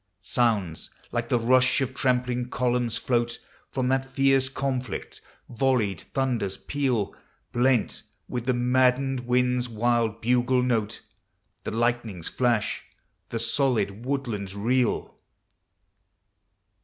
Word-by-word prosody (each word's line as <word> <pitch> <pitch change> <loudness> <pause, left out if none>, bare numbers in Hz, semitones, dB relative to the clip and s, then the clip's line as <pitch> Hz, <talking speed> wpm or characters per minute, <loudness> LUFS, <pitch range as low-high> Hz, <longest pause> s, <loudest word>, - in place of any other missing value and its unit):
Sounds 105 -9 0 0.2
like 120 -1 -2
the 125 - +3
msh 130 +3 +4
of 135 -1 -1
trampling 125 -1 0
columns 125 -2 0
floai 120 -1 0 0.4
Fn.n, 130 0 +2
thai 135 - -15
derce 135 0 +2
conflict; 130 -5 -3 0.3
volleyed 115 -7 +1
thunders 120 -8 0
peal, 130 -8 -1 0.4
Blenl 125 -1 +2 0.3
will, 125 - -3
the 125 +2 0
maddened 130 +2 +2
wind's 125 0 +2
wild 115 -1 +1
bugle 125 +2 +2
note; 115 -4 -1 0.6
The - - -1
lightnings 115 -6 -1
Hash, 120 -4 +1 0.5
He 115 - -2
solid 115 -4 0
woodlands 120 -8 -3
reel. 120 +4 0
125 Hz, 105 wpm, -26 LUFS, 115-130 Hz, 0.6 s, msh